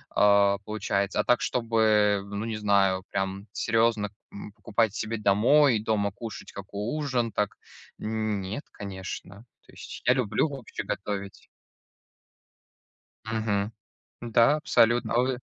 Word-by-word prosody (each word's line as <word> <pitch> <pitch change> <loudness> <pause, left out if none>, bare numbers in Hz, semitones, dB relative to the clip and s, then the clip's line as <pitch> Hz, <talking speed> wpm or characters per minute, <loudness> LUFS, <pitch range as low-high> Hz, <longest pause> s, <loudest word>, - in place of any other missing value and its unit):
э, 100 -1 +5
получается. 100 -2 -1
А - - +3
так, 125 - +3
чтобы, 110 -4 +2
ну, 100 +2 -4
не 110 -2 -3
знаю, 100 -3 +2
прям 95 +1 -3
серьезно, 115 -2 +1 0.2
м, 100 +1 -9
покупать 110 -1 0
себе 110 +1 -3
домой 115 +6 +4
и 105 - -5
дома 105 -2 0
кушать 110 +2 -8
како 100 +4 -5
ужин, 130 -6 -1
так 105 -1 -2 0.4
нет, 110 +1 -3
конечно, 100 +2 -8 0.2
то - - -18
есть - - -9
я - - +6
люблю 110 +2 +1
вообще 135 -5 -6
готовить. 100 0 -5 1.8
Мгм. 110 -2 -1 0.5
Да, 120 +4 +4
абсолютно. 120 -5 +2
А 120 - +3
вы? 130 -1 -1
105 Hz, 125 wpm, -27 LUFS, 100-115 Hz, 1.8 s, я